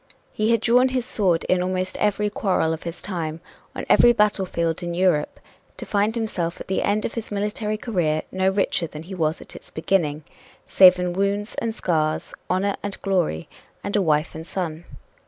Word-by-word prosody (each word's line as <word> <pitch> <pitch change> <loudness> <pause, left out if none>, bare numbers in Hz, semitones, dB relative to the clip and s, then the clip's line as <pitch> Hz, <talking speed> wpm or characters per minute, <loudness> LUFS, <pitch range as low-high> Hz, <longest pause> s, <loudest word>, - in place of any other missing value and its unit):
He 215 +1 0
had 230 -2 +3
drawn 245 +3 +4
his 255 -2 -1
sword 185 -9 +1
in 185 -1 +1
almost 185 0 -2
every 210 0 +1
quarrel 185 -6 +1
of 160 - -6
his 170 0 -7
time, 165 -4 -4 0.4
on - - -4
every 240 - +6
battlefield 190 -6 0
in 175 -1 -3
Europe, 175 -5 +1 0.4
to - - -7
find 210 +2 +1
himself, 185 -7 -2
at - - -8
the 190 - 0
end 205 +1 0
of - - -3
his 230 -2 -5
military 210 +1 -2
career, 175 -9 0
no 190 0 +2
richer 190 -3 0
than 150 0 -9
he 185 +4 -9
was 160 -3 -1
at - - -10
its - - -11
beginning 155 -3 0 0.4
save 185 -1 +7
in 180 -1 -1
wounds 200 +3 -1
and 225 -1 -2
scars, 155 -7 -1 0.2
honor 195 +2 0
and 200 -1 -5
glory, 175 - 0 0.4
and 200 - -3
a 205 - +3
wife 155 -3 +1
and 160 +1 -8
son. 170 -3 -4
185 Hz, 190 wpm, -23 LUFS, 165-210 Hz, 0.4 s, save